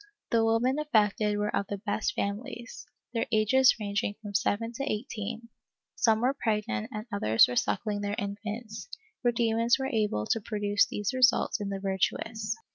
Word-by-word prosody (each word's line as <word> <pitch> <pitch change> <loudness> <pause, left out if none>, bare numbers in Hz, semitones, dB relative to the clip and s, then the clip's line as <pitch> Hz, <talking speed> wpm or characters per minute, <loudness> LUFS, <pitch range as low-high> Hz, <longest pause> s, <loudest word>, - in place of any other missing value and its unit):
The 230 -1 +4
women 235 +5 +2
affected 210 -7 +2
were 210 0 -1
of 200 - -1
the 205 - -3
best 205 +1 -2
families, 235 +4 -5 0.3
their 230 - -1
ages 245 +4 +5
ranging 205 -1 -2
from 205 -2 -8
7 210 +3 0
to 275 - -2
18 220 0 -4 0.2
— - - -62 0.2
some 220 -1 +3
were 255 +3 +2
pregnant 210 - -1
and 215 0 -5
others 115 - +4
were 125 - -4
suckling 205 - 0
their 205 0 -2
infants, 215 - -5 0.3
for 240 - +3
demons 230 +1 +2
were 265 0 -3
able 210 - 0
to 225 - 0
produce 205 -1 +1
these 205 +2 -2
results 250 -3 +3
in 200 - -3
the 195 -1 -3
virtuous. 210 +3 -1
215 Hz, 170 wpm, -29 LUFS, 205-230 Hz, 0.3 s, ages